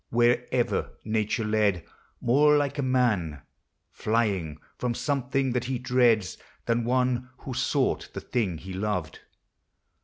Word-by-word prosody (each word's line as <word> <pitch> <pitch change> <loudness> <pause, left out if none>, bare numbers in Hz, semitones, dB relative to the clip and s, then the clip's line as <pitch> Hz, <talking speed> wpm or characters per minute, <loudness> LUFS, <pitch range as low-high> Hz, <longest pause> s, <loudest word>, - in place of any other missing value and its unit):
Wherever 120 +1 +1
nature 110 +1 0
led: 105 -4 +1 0.4
more 150 +5 +5
like 145 0 -1
a - - +2
man 110 - +1 0.5
Flying 100 -9 0 0.2
from 120 -1 -2
something 135 -1 0
that 125 0 -1
he 130 0 -1
dreads, 120 -7 +2 0.3
than 115 0 +1
one 125 0 +1
Who 130 - -6
sought - - 0
the - - -5
thing 100 -9 -1
he 95 +4 -8
loved. 95 -5 -2
120 Hz, 125 wpm, -27 LUFS, 105-130 Hz, 0.5 s, more